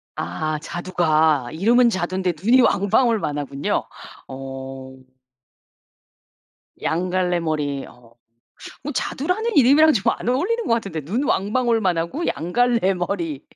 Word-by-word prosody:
아 150 - -3
자두가 160 -6 +1
이름은 235 +8 +4
자두인데 185 -2 -1
눈이 250 +5 +5
왕방울만 205 - +2
하군요. 140 0 -2 0.4
어. 135 0 -8 1.9
양 180 +3 -1
갈래 180 -1 0
머리 150 -4 -2
어. 120 -1 -19 0.7
어 295 - -4
자두라는 370 - -2
이름이랑 290 +4 +6
좀 205 - +2
안 - - -6
어울리는 390 - 0
거 - - +3
같은데 195 -9 -2
눈 215 - -2
왕방울만하고 220 - 0
양 170 +2 -3
갈래 235 -5 +2
머리 175 -5 -3
185 Hz, 255 characters per minute, -21 LUFS, 155-240 Hz, 1.9 s, 이름이랑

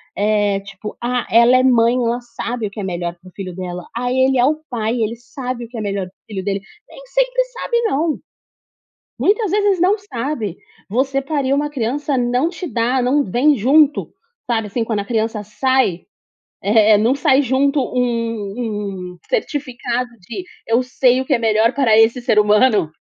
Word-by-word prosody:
é 205 -1 +1
tipo: 200 +1 -9
"Ah, 245 +1 -1
ela 235 +3 +6
é 255 - +3
mãe, 240 -2 +4
ela 240 -1 0
sabe 235 -1 -4
o - - -10
que 210 - -9
é - - -3
melhor 175 -2 -3
para 185 +1 -15
o - - -21
filho 185 -3 -6
dela. 180 -1 -5
Aí 245 +1 -1
ele 260 0 +3
é 245 - +4
o 305 +3 0
pai, 225 -2 -1
ele 230 -1 -1
sabe 245 0 -6
o - - -15
que 240 - -9
é - - -3
melhor 200 -2 -2
para 180 - -18
o - - -84
filho 190 -1 -3
dele". 195 0 -2 0.3
Nem - - -13
sempre - - +1
sabe - - -2
não, 315 -4 0 1.0
muitas 420 0 +2
vezes 405 -1 +2
não 385 +5 +3
sabe. 245 - -4 0.3
Você 265 +6 0
pariu 275 -1 0
uma 295 +1 0
criança 280 +2 -1
não 245 +4 +1
te 360 +1 -7
dá 250 -2 0
não 270 +4 +2
vem 250 +10 +3
junto, 290 +6 +3 0.4
sabe, 225 -3 0
assim, 230 +4 -2
quando 220 -2 -1
a - - -4
criança 220 0 -1
sai, 215 -3 0 0.6
eh, 210 +1 +5
não 230 +5 +3
sai 275 0 +3
junto 275 +3 +1
um 225 -6 -3
um - - -20
certificado 255 - -2
de: 235 - -7 0.2
"Eu 230 +2 +2
sei 255 0 +2
o - - -2
que 275 - +2
é - - +2
melhor 225 0 +2
para 250 -6 +3
esse 225 +3 +4
ser 235 -3 +2
humano." 210 -4 +3
240 Hz, 190 wpm, -19 LUFS, 210-270 Hz, 1.0 s, ela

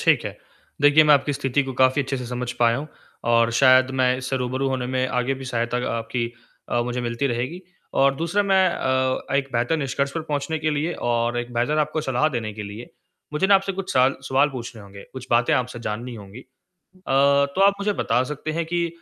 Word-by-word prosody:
ठीक - - +3
है। - - -5 0.4
देखिए, 145 +2 +6
मैं 150 -1 +7
आपकी 140 +1 +1
स्थिति 135 0 0
को 135 -1 -5
काफ़ी 130 +2 +4
अच्छे 135 0 -3
से 125 -1 -6
समझ 125 0 -4
पाया 115 -1 +3
हूँ 145 +4 -6 0.4
और 115 0 +4
शायद 130 +1 +5
मैं 125 0 +3
इससे 130 +1 -3
रूबरू 130 +1 -1
होने 130 -2 -2
में 130 0 0
आगे 125 +2 0
भी 135 0 -9
सहायता 120 -1 -2 0.2
आपकी 115 +1 -3 0.4
अ, 120 - +1
मुझे 125 +1 -3
मिलती 120 +3 -2
रहेगी। 130 +8 -3 0.4
और 135 0 +4
दूसरा 170 +7 0
मैं 190 -2 +3
अ, 130 -3 -1
एक 135 0 +1
बेहतर 120 +6 +1
निष्कर्ष 140 -1 -1
पर 165 - -3
पहुँचने 155 +1 -2
के 155 0 -1
लिए 155 +3 -1 0.2
और 120 0 0
एक 120 0 -5
बेहतर 125 +6 +1
आपको 155 +1 0
सलाह 135 0 +1
देने 115 -7 -4
के 105 - -6
लिए 105 +4 -9 0.4
मुझे 150 +6 +1
ना 200 - +5
आपसे 195 0 +2
कुछ 195 0 -5
सवाल 130 +1 +4
सवाल 135 +2 +3
पूछने 120 -3 -7
होंगे, 100 0 -12
कुछ 130 -1 -8
बातें 120 0 +3
आपसे 125 -1 -2
जाननी 120 +2 -5
होंगी। 105 +1 -11
अ, - - -17 0.6
तो 140 +3 +3
आप 200 0 +6
मुझे 205 +1 +1
बता 125 -9 +1
सकते 150 +1 -5
हैं 165 +1 -1
कि 170 +1 0
130 Hz, 215 wpm, -23 LUFS, 120-150 Hz, 0.6 s, मैं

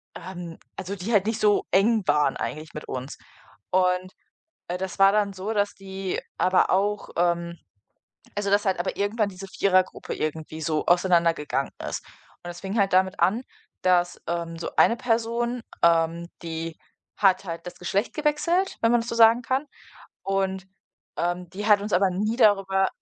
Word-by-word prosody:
ähm, 175 -2 -8 0.2
also, 190 +2 -4
die 195 +4 -5
halt 205 -2 +4
nicht 225 0 -1
so 210 -1 +3
eng 210 +3 +3
waren 150 0 +2
eigentlich 155 +1 -5
mit 150 - -7
uns. 130 +2 -6 0.5
Und, 185 0 +1 0.5
äh, 180 +1 -3
das 190 +1 -5
war 195 0 +7
dann 210 -1 +2
so, 195 +4 -4
dass 205 -1 0
die 190 -1 -4 0.2
aber 185 0 +3
auch, 205 +2 0
ähm 170 0 0 0.8
also, 205 -1 -1
dass 205 +1 +3
halt 190 -2 +1
aber 175 - -2
irgendwann 205 +1 0
diese 195 0 -9
Vierergruppe 185 -1 +1
irgendwie 155 +1 -4
so 155 -1 -1
auseinandergegangen 170 -6 +2 0.2
ist. - - -4 0.4
Und - - -8
das 175 0 -8
fing 195 +3 -3
halt 195 -1 +2
damit 190 +1 +2
an, 225 +7 +2 0.4
dass, 175 -1 +2
ähm, 170 -1 -3
so 165 - -5
eine 230 - +5
Person, 235 +1 -1 0.2
ähm, 170 0 +3 0.2
die 165 0 -4 0.4
hat 195 -1 +3
halt 170 0 -6
das 180 - -8
Geschlecht 190 +5 -1
gewechselt, 305 +5 +1
wenn 230 - +3
man 240 -1 +4
das 230 - -7
so - - -3
sagen 230 +1 +6
kann, 265 +3 -1 0.6
und, 190 -1 -1 0.5
ähm, 175 0 -2
die 200 +3 -6
hat 205 -2 +5
uns 210 - -5
aber 190 +1 +4
nie 210 +5 -1
darüber 195 -4 +4
190 Hz, 170 wpm, -25 LUFS, 175-210 Hz, 0.8 s, war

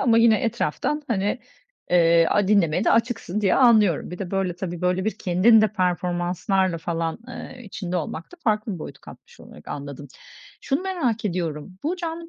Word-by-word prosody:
ama 230 -3 +4
yine 230 -2 +5
etraftan, 250 +5 -1
hani, 205 0 0 0.5
eee, 170 -1 +5
a 205 -2 +2
dinlemeye 185 -2 +3
de - - +3
açıksın 220 -4 0
diye 195 - +3
anlıyorum. 215 - +4
Bir 180 - -7
de, 190 -3 -5
böyle, 190 -3 -1
tabii, 175 -2 -5
böyle, 180 +1 0
bir 220 - -2
kendin 195 +6 +5
de 215 - +3
performanslarla 180 0 0
falan, 165 +1 -3
ııı, 255 +1 -8
içinde 185 -3 -5
olmak 165 - -5
da - - -12
farklı 215 -2 0
bir 175 - -7
boyut - - -8
katmış - - -15
olarak - - -14
anladım. 140 0 -7 0.5
Şunu 275 +6 -1
merak 270 - -1
ediyorum, 175 -1 -3
bu 340 +5 -1
canlı 335 -1 -5
190 Hz, 175 wpm, -23 LUFS, 175-230 Hz, 0.5 s, yine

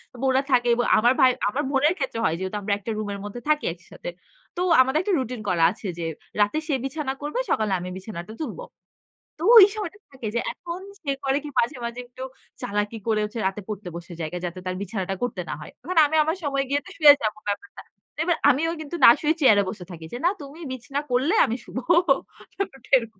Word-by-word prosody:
এব 240 - -10
ওরা 260 +1 +3
থাকে 245 -1 +3
এবং 240 - 0
আমার 240 +3 +4
ভাই, 255 -1 +7 0.2
আমার 275 +8 -2
বোনের 295 +4 +3
ক্ষেত্রে 270 -5 -3
হয় 160 - +2
যেহেতু 190 +2 -4
আমরা 200 0 0
একটা 215 +3 -5
রুম 215 -1 -3
এর 200 - -6
মধ্যে 205 +4 -7
থাকি 300 0 +2
একসাথে। - - -10 0.5
তো - - -1 0.2
আমাদের 265 +4 +2
একটা 395 +1 -1
রুটিন 250 -2 -4
করা 170 -2 +2
আছে 200 - -8
যে 170 - -2 0.4
রাতে 205 +8 +2
সে 295 - 0
বিছানা 270 0 -3
করবে 295 +11 -3
সকালে 215 -2 +1
আমি 180 - -6
বিছানাটা 190 0 -8
তুলব। 315 - -5 0.8
তো 325 - -5
ওই 395 - +12
সময়টা 405 -2 -5
থাকে 260 -5 -6
যে - - +2
এখন 350 +1 -7 0.2
সে 280 - -2
করে 270 +1 +2
কি 295 - -6
মাঝে, 255 +4 0
মাঝে, 235 +1 -5
একটু 250 +1 -9 0.4
চালাকি 210 -2 -2
করে 220 -1 +2
হচ্ছে 210 +2 -4
রাতে 195 +2 -4
পড়তে 210 -3 -6
বসে 175 +1 -8
জায়গা। 165 +3 -3
যাতে 175 +1 -5
তার 185 - -2
বিছানাটা 195 -2 -3
করতে 220 -7 -2
না - - -2
হয়। 150 - -9
এখন 365 0 -4
আমি 315 +2 -1
আমার 320 +4 -1
সময় 275 -1 0
গিয়ে 285 +1 +2
তো - - -11
শুয়ে 300 -3 +9
যাবো 215 0 -1
ব্যাপারটা। 205 - -4 0.3
তো - - -14
এবার 345 -1 +1
আমিও 320 +6 +2
কিন্তু 310 +3 -6
না - - +12
শুয়ে 310 +1 +2
চেয়ারে 210 -7 +6
বসে 190 -5 -7
থাকি 165 -2 -9
যে, - - -3
না 350 - +6
তুমি 285 +3 -10
বিছানা 275 +3 -4
করলে 260 +9 +2
আমি 235 - -2
শুবো 255 - -5 0.8
ব্যাপারটা 330 -9 -5
এরকম 230 -5 -7
250 Hz, 220 wpm, -24 LUFS, 205-295 Hz, 0.8 s, ওই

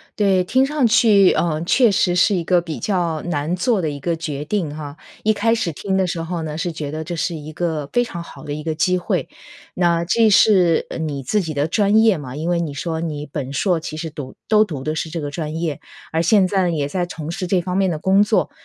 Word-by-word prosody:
对。 195 -4 +2
听 260 +8 +2
上 285 -1 +1
去， 210 -4 +5
呃， 155 -3 0
确 235 +6 +4
实 180 -2 +2
是 195 +3 +3
一 175 - -1
个 180 +1 +2
比 165 -2 -6
较 175 -6 -1
难 160 0 -2
做 195 +2 +1
的 160 - -1
一 145 -1 -6
个 170 +4 -1
决 150 -3 -5
定 175 -4 -2
啊。 145 -2 -7 0.3
一 215 - +3
开 225 +3 +1
始 180 -7 -1
听 190 +5 -2
的 190 - +2
时 170 -2 -3
候 165 0 -4
呢 150 -1 -5
是 175 +1 -2
觉 150 -3 -5
得 155 +1 -4
这 175 +1 -5
是 170 +2 -1
一 155 0 -8
个 155 -4 -2
非 245 - +2
常 175 -7 -6
好 170 - -12
的 145 - -5
一 150 - -5
个 160 0 -2
机 180 +3 +2
会， 180 - -2 0.5
那 170 -1 +1
这 220 +5 +3
是， 185 -5 +4
呃， - - -4
你 145 -4 -3
自 210 - +1
己 160 -4 -4
的 145 +2 +1
专 205 +5 +2
业 220 -4 +5
嘛， 130 -4 -8
因 155 +3 -4
为 175 -1 +1
你 155 -4 -3
说 160 +3 -3
你 150 -3 -4
本 140 -2 -5
硕 175 +4 +1
其 155 -1 -7
实 160 0 -4
读 145 -4 -8
都 215 0 +5
读 155 -10 -6
的 155 +2 -2
是 160 0 -3
这 165 - -4
个 145 -1 -4
专 155 0 -4
业。 160 -5 -2 0.3
而 160 - +1
现 190 +3 +4
在 190 0 +1
呢， - - 0
也 145 -4 -1
在 180 +3 -2
从 160 -2 -6
事 180 +1 -4
这 180 0 +2
方 180 +1 -4
面 195 -1 +2
的 165 - -2
工 190 +5 +3
作， 210 - +1
170 Hz, 275 characters per minute, -20 LUFS, 155-190 Hz, 0.5 s, 去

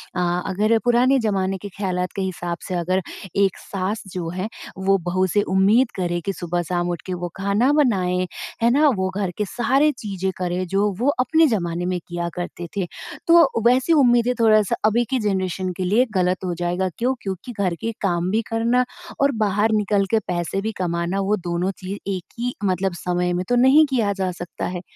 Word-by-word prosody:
अ, 180 0 0
अगर 210 +4 +2
पुराने 250 +3 +4
ज़माने 195 -4 0
के 205 +2 -8
ख़्यालात 185 -2 -2
के 195 - -2
हिसाब 175 -2 -3
से 185 - -3
अगर 185 +2 0 0.3
एक 195 -2 +2
सास 195 +2 -4
जो 175 -3 -3
है, 185 +4 -3 0.3
वो 195 +1 +2
बहू 185 +1 +1
से 205 +3 +2
उम्मीद 215 +7 +4
करे 175 -2 -1
कि 195 - -1
सुबह-शाम 175 0 -2
उठ 175 -2 -3
के 185 - -3
वो 175 0 -3
खाना 200 +7 +2
बनाए, 185 -11 +2 0.4
है 235 - +5
ना? 295 +4 +4
वो 190 -1 -1
घर 195 -3 -1
के 210 - 0
सारे 265 +8 +2
चीज़ें 190 -3 -3
करें, 180 0 -2
जो 195 +3 +1
वो 250 - +1
अपने 320 +5 +4
ज़माने 175 - -1
में 180 0 -1
किया 175 0 -3
करते 175 -1 -5
थे, 190 - 0 0.4
तो 335 -9 +5
वैसी 255 +7 +4
उम्मीदें 245 -4 +4
थोड़ा-सा 215 -3 +4
अभी 225 +3 +3
की 265 - +1
जनरेशन 190 -3 -1
के 190 - -2
लिए 215 +8 +3
गलत 185 0 +1
हो 180 - -1
जाएगा। 175 +2 -1
क्यों? 250 +3 +1
क्योंकि 190 +4 -5
घर 185 -4 +1
के 230 - -1
काम 175 -2 0
भी 220 - +2
करना 235 +2 +2 0.4
और 280 0 +4
बाहर 210 +2 +2
निकल 205 -2 +2
के 225 - +4
पैसे 175 +2 -2
भी 220 - -2
कमाना, 175 +1 -1
वो 195 +2 +1
दोनों 175 +1 -2
चीज़ 190 +2 -5 0.2
एक 180 - -7
ही 245 +1 -1
मतलब 185 -1 0
समय 180 0 -1
में 180 +1 -1
तो 245 - +3
नहीं 265 +5 +6
किया 225 -7 +1
जा 190 -2 -2
सकता 175 0 -6
है। 180 -1 -4
195 Hz, 195 wpm, -22 LUFS, 180-225 Hz, 0.4 s, नहीं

